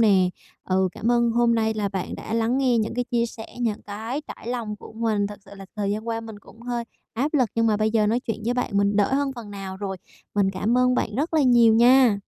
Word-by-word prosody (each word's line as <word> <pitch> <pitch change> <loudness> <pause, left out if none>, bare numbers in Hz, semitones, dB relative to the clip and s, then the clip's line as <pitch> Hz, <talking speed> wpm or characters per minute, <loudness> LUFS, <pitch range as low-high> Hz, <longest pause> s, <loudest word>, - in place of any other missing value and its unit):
nè? 195 -5 +5 0.4
Ừ, 190 0 +1
cảm 230 - -1
ơn 235 -1 +3
hôm 235 0 +3
nay 220 -1 +1
là 210 -2 -1
bạn 190 -2 -4
đã - - -5
lắng 230 +3 +1
nghe 255 -3 +2
những 220 0 -1
cái 245 +1 -1
chia 240 -1 0
sẻ, 225 -1 -9
những 220 -3 -1
cái 220 +7 -5
trải 230 - -8
lòng 230 -4 -3
của - - -12
mình. 220 -2 0
Thật 205 0 -8
sự - - -17
là 195 -1 -11
thời 200 -1 -1
gian 215 +3 -3
qua 225 0 -1
mình 220 -2 -9
cũng 220 +2 -18
hơi 240 -1 -3 0.3
áp 280 +7 -1
lực, 255 -6 +3
nhưng 230 0 +2
mà 215 -2 +3
bây 215 +1 +1
giờ 215 -1 +2
nói 230 +4 +1
chuyện 225 -2 -4
với 240 +2 0
bạn 250 - -1
mình 200 0 +2
đỡ 205 +5 +2
hơn 280 0 0
phần 225 -3 -8
nào 195 -2 -6
rồi. 190 -1 -4 0.4
Mình 200 -2 +2
cảm 225 +5 0
ơn 250 0 +3
bạn 220 -4 -1
rất 310 +5 -1
là 310 - +4
nhiều 240 -3 +5
nha! 240 -2 +5
225 Hz, 265 wpm, -24 LUFS, 205-240 Hz, 0.4 s, nè